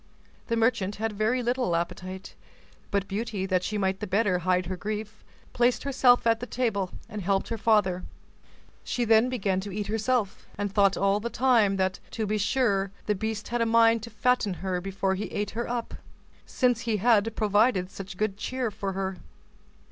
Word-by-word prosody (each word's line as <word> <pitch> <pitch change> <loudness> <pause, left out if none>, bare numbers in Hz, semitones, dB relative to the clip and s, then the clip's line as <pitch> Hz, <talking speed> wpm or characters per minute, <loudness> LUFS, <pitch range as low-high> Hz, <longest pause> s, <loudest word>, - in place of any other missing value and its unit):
The 230 - 0
merchant 225 -4 +1
had 225 +1 -2
very 220 +5 0
little 245 -7 0
appetite; 185 +2 -4 0.6
but 200 -1 -1
Beauty, 205 -1 -3
that 185 -2 +1
she 210 +3 -3
might 190 -1 0
the 210 - -4
better 195 -2 +2
hide 180 +1 +1
her 185 +2 -3
grief, 215 +2 -5 0.3
placed 240 +1 +2
herself 255 -3 +4
at 230 -1 +3
the 245 - -6
table, 220 -8 -1 0.2
and 210 - -6
helped 195 +1 0
her 230 - -2
father; 205 -5 +2 0.8
she 245 - -1
then 225 +2 +4
began 195 -7 0
to 200 +1 -6
eat 205 +2 -3
herself, 220 0 -1
and 205 -1 -2
thought 200 -1 +4
all 195 +1 +2
the 235 +3 -3
time 235 -6 +3
that, 190 -1 0 0.2
to 220 - 0
be 210 +1 -1
sure, 205 -3 +1 0.2
the 210 - +1
beast 220 +1 -4
had 240 0 -1
a - - +3
mind 230 0 +4
to 230 - -8
fatten 230 -3 +1
her 180 -1 -1
before 195 0 -1
he 190 +2 -3
ate 205 0 -3
her 235 +1 -4
up, 240 -1 -3 0.5
since 245 -3 +1
he 230 -2 -1
had 225 0 +3
provided 205 -3 +2
such 195 -1 -8
good 210 -1 -1
cheer 250 +1 -2
for 195 -1 -4
her. 190 0 -3
210 Hz, 185 wpm, -27 LUFS, 195-230 Hz, 0.8 s, herself